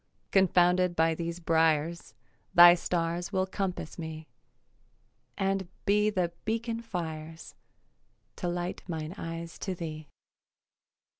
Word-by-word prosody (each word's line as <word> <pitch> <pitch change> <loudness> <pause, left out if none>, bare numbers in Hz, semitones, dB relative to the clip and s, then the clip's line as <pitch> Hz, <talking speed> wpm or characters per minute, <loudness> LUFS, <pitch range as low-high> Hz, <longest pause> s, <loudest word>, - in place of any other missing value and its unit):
Confounded 180 -1 +4
by 165 0 +3
these 170 +1 -4
briars, 165 0 +1 0.4
Thy 175 0 +10
stars 175 0 -2
will 190 -2 +1
compass 190 -4 -4
me 160 -1 -6 1.1
And 195 -1 0 0.2
be 210 +1 +3
the 180 -4 0
beacon 230 +1 -2
fires 165 -6 -6 0.8
To 180 - -3
light 175 +1 -3
mine 160 -1 -4
eyes 165 -2 -6
to 190 -2 -3
thee. 155 -3 -6
175 Hz, 105 wpm, -29 LUFS, 165-190 Hz, 1.1 s, Thy